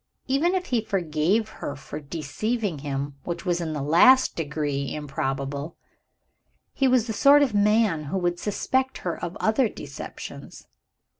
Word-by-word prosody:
Even 300 +8 +2
if 365 -1 -1
he 235 - +3
forgave 190 +1 0
her 145 - -3
for 145 +1 -8
deceiving 170 - -3
him 140 0 -3
which 170 +1 -5
was 175 -1 0
in 160 -2 -3
the 145 -2 -3
last 255 - +5
degree 145 -3 -2
improbable 140 0 -3 1.0
he 270 - +2
was 255 -3 +3
the 225 - -3
sort 285 +5 +6
of 260 -6 0
man 205 -6 +3
who 160 +7 -2
would 175 -1 -1
suspect 260 +5 -1
her 175 - -1
of 170 - -4
other 220 +2 +2
deceptions. - - -9
175 Hz, 150 wpm, -25 LUFS, 150-225 Hz, 1.0 s, sort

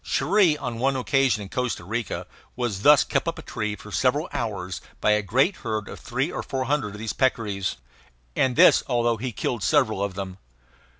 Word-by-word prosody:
Cherrie, 170 +1 +3
on 120 -5 -5
one 135 +2 +1
occasion 130 -4 +1
in 95 - -10
Costa 125 -7 -2
Rica, 115 +3 -3 0.3
was 120 -6 -2
thus 145 +4 +7
kept - - -1
up - - -2
a - - -9
tree 105 -1 -3
for 105 - -12
several 140 - +1
hours 95 -6 -3 0.2
by 105 - +3
a 105 0 +3
great 130 - +1
herd 110 -2 -3
of - - -9
three 135 +5 -2
or - - -3
four 130 -1 -3
hundred 130 -6 -1
of - - -8
these 110 0 -4
peccaries; 105 -7 0 0.6
and 130 -2 +2
this - - +7
although 120 -2 +1
he 125 +3 -4
killed 120 +1 -3
several 110 -7 +2
of 100 -2 -3
them. 95 -1 -6
120 Hz, 195 wpm, -25 LUFS, 105-135 Hz, 0.6 s, thus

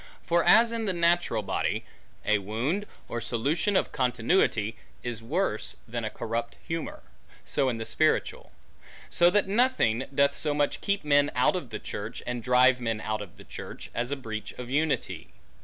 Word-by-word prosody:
For 170 0 +2
as 230 +6 +6
in 230 -1 -2
the 190 - +1
natural 170 -10 +2
body, - - -1 0.4
a 105 -1 +3
wound, 125 - -2 0.2
or 120 - -4
solution 150 - 0
of - - +2
continuity, 120 - +1 0.3
is 120 -2 -3
worse 140 - -1
than 115 0 -4
a 110 - -1
corrupt 115 +2 -4
humor; 165 0 -4 0.4
so 135 -3 +1
in 120 - -2
the 115 - -4
spiritual. - - +1 0.6
So 175 0 +5
that 205 +1 +2
nothing, 200 - +2
doth 140 0 +3
so 150 -2 +1
much 145 -1 0
keep 200 -4 -1
men 145 0 +4
out 125 +8 +3
of 175 -9 -4
the 110 - -4
church, 105 +1 -6
and 120 -1 -3
drive 125 +1 +4
men 115 -2 -1
out 110 0 -3
of 100 -4 -10
the - - -12
church, - - -9
as 120 +2 -2
breach 110 -5 -6
of 125 0 -8
unity. 150 +2 -1
130 Hz, 175 wpm, -28 LUFS, 115-170 Hz, 0.6 s, as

